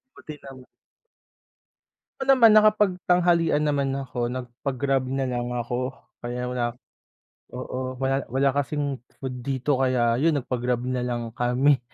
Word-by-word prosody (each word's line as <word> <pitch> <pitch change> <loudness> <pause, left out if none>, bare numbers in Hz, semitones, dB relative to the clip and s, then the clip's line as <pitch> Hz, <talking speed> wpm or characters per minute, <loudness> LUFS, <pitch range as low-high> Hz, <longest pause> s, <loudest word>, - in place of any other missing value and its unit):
Buti 150 -2 -10
nam 130 -2 -11 1.5
Oo - - -1
naman 230 -5 +7
nakapagtanghalian 180 -6 +3
naman 140 -2 +1
ako, 125 -2 -3
nagpa 125 +2 -5
grab 135 -1 +1
nalang 125 -2 -2
ako 125 +2 -2 0.3
kaya 125 +1 -3
wala, 120 -1 -1 0.8
oo 130 0 -5
wala 135 +1 -1
wala 135 +3 +2
kasing 145 0 -2 0.2
food 130 -2 -6
dito 135 +1 -1
kaya 125 -2 +2
'yun 160 0 +3
nagpag 125 -2 -3
grab 125 -1 0
nalang 125 -2 -2
kami. 125 +4 +2
130 Hz, 125 wpm, -25 LUFS, 125-145 Hz, 1.5 s, naman